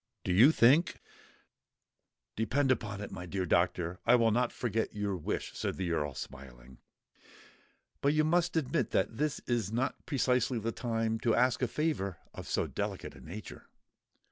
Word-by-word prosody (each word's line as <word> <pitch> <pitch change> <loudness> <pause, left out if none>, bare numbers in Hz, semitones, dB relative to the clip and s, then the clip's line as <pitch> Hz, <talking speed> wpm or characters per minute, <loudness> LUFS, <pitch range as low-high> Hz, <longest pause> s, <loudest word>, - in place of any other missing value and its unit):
Do 90 - 0
you 120 - +7
think——" 145 +5 +4 1.4
"Depend 130 +5 +1
upon 105 -5 -2
it, 105 - -6
my 90 -1 -7
dear 95 +1 -2
Doctor, 85 0 +1
I 120 - +5
will 115 -2 +4
not 120 +2 +1
forget 110 -3 -2
your 100 -2 -1
wish," 85 - -3
said - - -3
the 90 -3 -2
Earl, 75 -4 -1
smiling: 65 -1 -10 1.2
"but 140 - +3
you 155 - +4
must 170 +2 +1
admit 145 -6 0
that 110 - 0
this 150 0 -1
is 115 -5 -1
not 125 +4 -2
precisely 125 -3 +1
the 115 +1 -2
time 115 -1 -1
to 115 -1 +2
ask 125 +1 +2
a 125 - +2
favour 115 - -1 0.2
of - - -8
so - - 0
delicate - - -4
a - - -14
nature." 100 +7 -9
115 Hz, 165 wpm, -31 LUFS, 95-130 Hz, 1.4 s, you